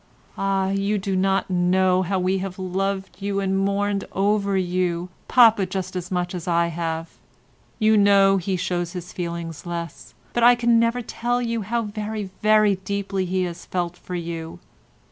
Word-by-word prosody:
Ah, 195 Hz, -1 st, 0 dB
you 200 Hz, +2 st, 0 dB
do 195 Hz, -1 st, -2 dB
not 195 Hz, +1 st, +1 dB
know 185 Hz, +1 st, +3 dB
how 190 Hz, +1 st, -1 dB
we 185 Hz, +1 st, +1 dB
have 190 Hz, -1 st, -5 dB
loved 190 Hz, +1 st, -3 dB
you 200 Hz, 0 st, -1 dB
and 195 Hz, -1 st, 0 dB
mourned 200 Hz, +1 st, 0 dB
over 200 Hz, 0 st, +1 dB
you, 180 Hz, -1 st, -1 dB, 0.2 s
papa 225 Hz, -6 st, +5 dB
just 185 Hz, 0 st, -4 dB
as 180 Hz, 0 st, -4 dB
much 180 Hz, -1 st, -2 dB
as 175 Hz, -2 st, -6 dB
I 170 Hz, -1 st, +2 dB
have. 165 Hz, 0 st, -4 dB, 0.6 s
You 220 Hz, 0 st, +4 dB
know 200 Hz, -1 st, +5 dB
he 185 Hz, 0 st, -1 dB
shows 175 Hz, -1 st, -2 dB
his 180 Hz, -1 st, -7 dB
feelings 170 Hz, -3 st, -5 dB
less, 170 Hz, -1 st, -6 dB, 0.2 s
but 240 Hz, -, 0 dB
I 240 Hz, +1 st, +7 dB
can 235 Hz, -1 st, +3 dB
never 230 Hz, +1 st, +1 dB
tell 240 Hz, +2 st, -1 dB
you 230 Hz, -2 st, -2 dB
how 230 Hz, +4 st, -1 dB
very, 210 Hz, -1 st, -5 dB
very 215 Hz, -2 st, +4 dB
deeply 195 Hz, 0 st, -2 dB
he 185 Hz, +1 st, 0 dB
has 175 Hz, -1 st, -6 dB
felt 175 Hz, -1 st, -2 dB
for 180 Hz, -, -7 dB
you. 165 Hz, -1 st, -5 dB
190 Hz, 170 wpm, -23 LUFS, 180-205 Hz, 0.6 s, I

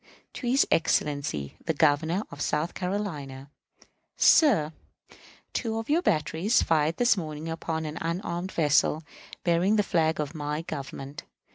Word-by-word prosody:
To 250 Hz, -, -5 dB
his 260 Hz, +3 st, +4 dB
Excellency 145 Hz, -, 0 dB
the 160 Hz, -, -1 dB
Governor 160 Hz, +6 st, +2 dB
of 145 Hz, -, -8 dB
South 150 Hz, +4 st, -1 dB
Carolina._ 155 Hz, -9 st, -4 dB, 0.7 s
Sir: 200 Hz, -, +5 dB, 0.8 s
Two 225 Hz, -2 st, -2 dB
of 225 Hz, +5 st, -3 dB
your 330 Hz, +3 st, +3 dB
batteries 165 Hz, -, +1 dB
fired 160 Hz, 0 st, +1 dB
this 245 Hz, -1 st, +4 dB
morning 155 Hz, -3 st, -5 dB
upon 160 Hz, -1 st, -3 dB
an 155 Hz, +2 st, -5 dB
unarmed 175 Hz, +2 st, -3 dB
vessel 155 Hz, 0 st, +2 dB, 0.4 s
bearing 175 Hz, +4 st, +2 dB
the 210 Hz, -, +3 dB
flag 160 Hz, -5 st, +1 dB
of 150 Hz, 0 st, -3 dB
my 150 Hz, 0 st, -3 dB
Government. 140 Hz, -1 st, -7 dB
160 Hz, 135 wpm, -27 LUFS, 150-190 Hz, 0.8 s, Sir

